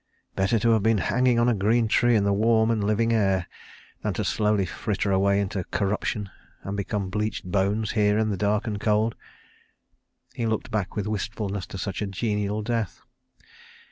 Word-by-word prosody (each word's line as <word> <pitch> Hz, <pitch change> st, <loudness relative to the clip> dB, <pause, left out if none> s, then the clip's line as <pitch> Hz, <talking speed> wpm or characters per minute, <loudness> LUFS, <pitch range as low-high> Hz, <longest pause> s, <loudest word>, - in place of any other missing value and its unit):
"Better 95 Hz, +4 st, +2 dB
to 115 Hz, +2 st, +2 dB
have 110 Hz, -2 st, +3 dB
been 110 Hz, +1 st, +3 dB
hanging 125 Hz, +4 st, +2 dB
on 120 Hz, +1 st, +3 dB
a 120 Hz, -, +4 dB
green 110 Hz, +3 st, +2 dB
tree 120 Hz, +2 st, +3 dB
in 105 Hz, -, +3 dB
the 100 Hz, 0 st, +2 dB
warm 110 Hz, +2 st, +3 dB
and 110 Hz, -3 st, 0 dB
living 110 Hz, +3 st, +1 dB
air 95 Hz, -5 st, +2 dB, 0.6 s
than -, -, -2 dB
to -, -, -1 dB
slowly 105 Hz, -2 st, +1 dB
fritter 100 Hz, +2 st, -2 dB
away 100 Hz, +1 st, +3 dB
into 95 Hz, -1 st, -2 dB
corruption, 105 Hz, 0 st, -2 dB, 0.3 s
and 100 Hz, -, -4 dB
become 100 Hz, -1 st, -3 dB
bleached 105 Hz, -1 st, -2 dB
bones 100 Hz, +3 st, 0 dB
here 105 Hz, -1 st, +2 dB
in 110 Hz, -1 st, +1 dB
the -, -, 0 dB
dark 105 Hz, +2 st, +1 dB
and 105 Hz, -3 st, -3 dB
cold." 110 Hz, +1 st, +1 dB, 1.2 s
He 115 Hz, -, -2 dB
looked 110 Hz, -1 st, -2 dB
back 105 Hz, -4 st, -2 dB
with 105 Hz, -, -2 dB
wistfulness 100 Hz, -2 st, -3 dB
to -, -, -7 dB
such 100 Hz, +1 st, -4 dB
a 105 Hz, -, -1 dB
genial 105 Hz, +1 st, -2 dB
death. 115 Hz, -2 st, -2 dB
105 Hz, 180 wpm, -25 LUFS, 100-110 Hz, 1.2 s, a